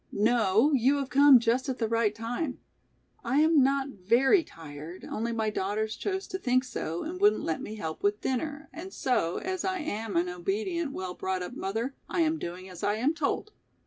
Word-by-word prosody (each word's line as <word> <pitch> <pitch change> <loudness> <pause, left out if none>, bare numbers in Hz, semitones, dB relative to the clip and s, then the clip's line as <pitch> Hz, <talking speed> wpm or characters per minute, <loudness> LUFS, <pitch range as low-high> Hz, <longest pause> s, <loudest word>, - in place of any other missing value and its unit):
"No, 225 +3 +3
you 265 +2 +4
have 275 -2 -3
come 280 0 +8
just 240 +4 +1
at 260 - -2
the 225 - 0
right 225 -2 +1
time. 245 +5 -3 0.7
I 255 +4 +1
am 315 -2 +5
not 275 +1 +2
very 250 - +3
tired, 160 - -10
only 230 +2 -3
my 220 -2 -1
daughters 210 +2 -2
chose 385 -1 -3
to 375 - -4
think 255 -5 +2
so 170 -10 -4
and 360 +4 -6
wouldn't 415 +1 +4
let 160 - -2
me 215 - -6
help 160 -6 -5
with 205 +1 +1
dinner 290 +4 -2
and 360 +4 -8
so, 210 - 0
as 375 -1 -3
I 375 0 0
am 225 - -4
an 175 +1 +2
obedient, 215 - -2
well 185 -1 -4
brought 185 0 -2
up 180 - -7
mother, 230 +3 -3 0.2
I 345 - 0
am 320 0 +1
doing 180 +2 -6
as 180 -2 -10
I 205 - +2
am 255 +8 +1
told. 325 +6 -2
235 Hz, 200 wpm, -28 LUFS, 200-290 Hz, 0.7 s, come